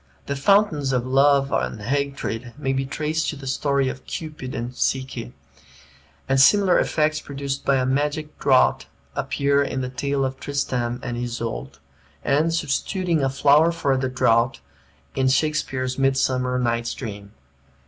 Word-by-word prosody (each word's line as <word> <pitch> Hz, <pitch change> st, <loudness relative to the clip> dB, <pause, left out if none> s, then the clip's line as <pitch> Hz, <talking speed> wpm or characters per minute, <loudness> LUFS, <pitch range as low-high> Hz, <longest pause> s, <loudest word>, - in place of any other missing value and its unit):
The 140 Hz, -, -2 dB
fountains 150 Hz, -3 st, +2 dB
of 125 Hz, -1 st, 0 dB
Love 135 Hz, +1 st, +3 dB
and 110 Hz, -, -1 dB
Hatred 130 Hz, -1 st, -3 dB
may 135 Hz, -3 st, -1 dB
be 135 Hz, 0 st, -1 dB
traced 155 Hz, +3 st, -1 dB
to -, -, -4 dB
the 140 Hz, -1 st, -10 dB
story 140 Hz, +1 st, 0 dB
of 130 Hz, 0 st, -6 dB
Cupid 155 Hz, -6 st, -6 dB
and 120 Hz, +1 st, -4 dB
Psyche; 130 Hz, -, -2 dB, 1.0 s
and 135 Hz, 0 st, +3 dB
similar 195 Hz, +5 st, +5 dB
effects 155 Hz, 0 st, +1 dB
produced 140 Hz, -1 st, -5 dB
by 140 Hz, -, +3 dB
a 130 Hz, -1 st, +1 dB
magic 150 Hz, +3 st, -1 dB
draught 130 Hz, -2 st, +3 dB, 0.3 s
appear 140 Hz, +1 st, +1 dB
in 135 Hz, -1 st, -2 dB
the 125 Hz, -, -3 dB
tale 135 Hz, +1 st, -1 dB
of 130 Hz, 0 st, -4 dB
Tristram 125 Hz, -4 st, -2 dB
and 120 Hz, -1 st, -4 dB
Isoude, 120 Hz, -1 st, -4 dB, 0.5 s
and, 150 Hz, +4 st, +2 dB
substituting 165 Hz, +2 st, 0 dB
a 135 Hz, -, +2 dB
flower 145 Hz, +5 st, +4 dB
for 145 Hz, -5 st, 0 dB
the 130 Hz, 0 st, -1 dB
draught, 120 Hz, -1 st, +2 dB, 0.5 s
in 130 Hz, -1 st, +1 dB
Shakspeare's 130 Hz, -2 st, 0 dB
"Midsummer 130 Hz, -2 st, +1 dB
Night's 120 Hz, -1 st, -1 dB
Dream." 105 Hz, -4 st, -8 dB
135 Hz, 150 wpm, -23 LUFS, 130-145 Hz, 1.0 s, similar